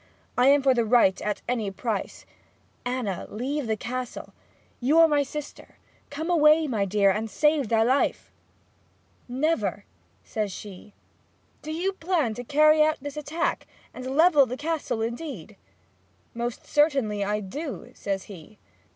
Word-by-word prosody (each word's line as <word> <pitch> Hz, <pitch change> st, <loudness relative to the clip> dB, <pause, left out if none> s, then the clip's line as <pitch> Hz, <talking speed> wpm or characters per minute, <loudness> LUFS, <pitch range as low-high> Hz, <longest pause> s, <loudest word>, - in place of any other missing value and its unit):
I 250 Hz, +1 st, +4 dB
am 280 Hz, 0 st, +5 dB
for 270 Hz, -1 st, +5 dB
the 240 Hz, -2 st, +1 dB
right 220 Hz, -4 st, +3 dB
at 210 Hz, 0 st, -3 dB
any 230 Hz, -5 st, -1 dB
price. 200 Hz, +1 st, -4 dB, 0.6 s
Anna, 245 Hz, -7 st, -3 dB
leave 260 Hz, +4 st, -3 dB
the 220 Hz, -1 st, 0 dB
Castle; 250 Hz, +2 st, -6 dB, 0.5 s
you 275 Hz, +6 st, +2 dB
are 330 Hz, 0 st, +8 dB
my 295 Hz, -2 st, +2 dB
sister; 295 Hz, +1 st, -7 dB, 0.3 s
come 305 Hz, +3 st, -5 dB
away, 315 Hz, -2 st, +5 dB
my 220 Hz, -8 st, 0 dB
dear, 200 Hz, 0 st, +3 dB
and 220 Hz, +3 st, -2 dB
save 300 Hz, -2 st, +1 dB
thy 225 Hz, -1 st, +3 dB
life!' 260 Hz, +4 st, 0 dB, 1.0 s
'Never!' 305 Hz, +7 st, -1 dB, 0.4 s
says 210 Hz, -2 st, -3 dB
she. 200 Hz, +1 st, -10 dB, 0.7 s
'Do 310 Hz, -, -6 dB
you 360 Hz, +5 st, -1 dB
plan 325 Hz, -10 st, 0 dB
to 245 Hz, -, -6 dB
carry 305 Hz, +4 st, +4 dB
out 310 Hz, +1 st, +3 dB
this 285 Hz, +1 st, -7 dB
attack, 300 Hz, +3 st, -2 dB, 0.3 s
and 260 Hz, +2 st, -5 dB
level 315 Hz, -5 st, +6 dB
the 250 Hz, +2 st, -5 dB
Castle 300 Hz, -7 st, -2 dB
indeed?' 235 Hz, -, -6 dB, 0.8 s
'Most 235 Hz, 0 st, -4 dB
certainly 270 Hz, -9 st, +1 dB
I 210 Hz, +1 st, -1 dB
do,' 235 Hz, -, -6 dB
says 195 Hz, -2 st, -3 dB
he. 200 Hz, +2 st, -13 dB
255 Hz, 145 wpm, -26 LUFS, 215-300 Hz, 1.0 s, are